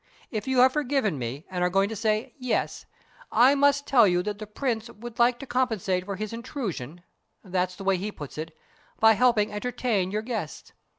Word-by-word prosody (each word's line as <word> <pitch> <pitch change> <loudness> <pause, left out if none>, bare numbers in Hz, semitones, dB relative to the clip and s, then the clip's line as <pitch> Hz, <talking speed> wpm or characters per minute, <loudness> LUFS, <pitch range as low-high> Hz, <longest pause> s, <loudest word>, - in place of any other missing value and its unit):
If 215 0 -4
you 265 -1 0
have 260 +1 +6
forgiven 270 - 0
me 125 +6 -5
and 180 -1 -2
are 180 - +3
going 195 +2 +2
to 225 - -5
say 215 +1 -1
'yes,' 250 -3 -2 0.4
I 250 +5 +6
must 285 0 +3
tell 240 -6 +5
you 180 -1 +2
that 205 0 -4
the 215 - -7
Prince 230 +1 -2
would 235 +2 -10
like 240 +1 +4
to 275 - -8
compensate 220 -8 0
for 200 0 -4
his 215 +3 -5
intrusion 195 - -5 0.4
that's 185 -1 -1
the 195 - -9
way 195 -1 +2
he 205 +4 -4
puts 150 -4 -9
it 160 0 -7 0.4
by 220 0 +7
helping 225 -2 +3
entertain 225 -3 -1
your 210 +2 -2
guests. 220 -10 -5
215 Hz, 195 wpm, -26 LUFS, 185-245 Hz, 0.4 s, by